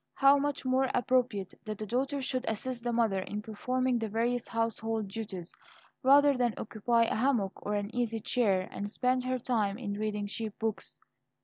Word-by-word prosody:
How 275 +1 +6
much 285 -1 -2
more 260 +1 +2
appropriate 245 -6 +1
that 215 -1 -5
the 215 - -4
daughter 265 +5 -1
should 255 -1 -1
assist 235 +2 -3
the 240 - 0
mother 225 -5 +2
in 210 +2 -4
performing 250 +3 0
the 225 -1 -2
various 235 +3 0
household 225 -1 -1
duties, 195 -4 -6 0.5
rather 285 +1 +6
than 245 -3 +1
occupy 230 +2 +1
a 230 - 0
hammock 225 -5 +1
or 210 - -1
an 205 +1 -3
easy 230 -2 0
chair, 200 -5 +1
and 205 +1 -4
spend 255 +3 +1
her 255 0 0
time 220 -5 0
in 215 -5 -4
reading 210 0 -2
cheap 210 +1 -5
books! 220 -1 -3
230 Hz, 180 wpm, -30 LUFS, 210-255 Hz, 0.5 s, How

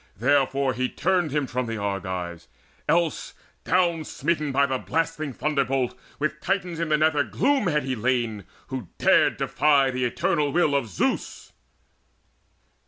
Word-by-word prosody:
Therefore 135 +2 +2
he 130 0 -1
turned 180 -3 +1
him 145 0 0
from 125 0 -3
the 115 0 -3
Argives 95 -6 -4 0.4
else, 170 -1 0 0.3
Down 170 -3 +2
smitten 155 0 -1
by 140 +1 +3
the 130 -2 -1
blasting 160 -1 -2
thunderbolt, 135 -2 0 0.2
With 150 +1 -2
Titans 180 -3 -1
in 170 -1 -1
the 155 - +3
nether 155 -1 +3
gloom 265 - +1
he 170 - +1
had 150 -3 0
lain, 115 -4 0 0.2
Who 130 -7 -5
dared - - +4
defy 140 -3 +3
the 130 0 -2
eternal 145 +4 0
will 170 -3 +2
of 140 -4 +1
Zeus. 95 - -2
140 Hz, 145 wpm, -25 LUFS, 125-160 Hz, 0.4 s, dared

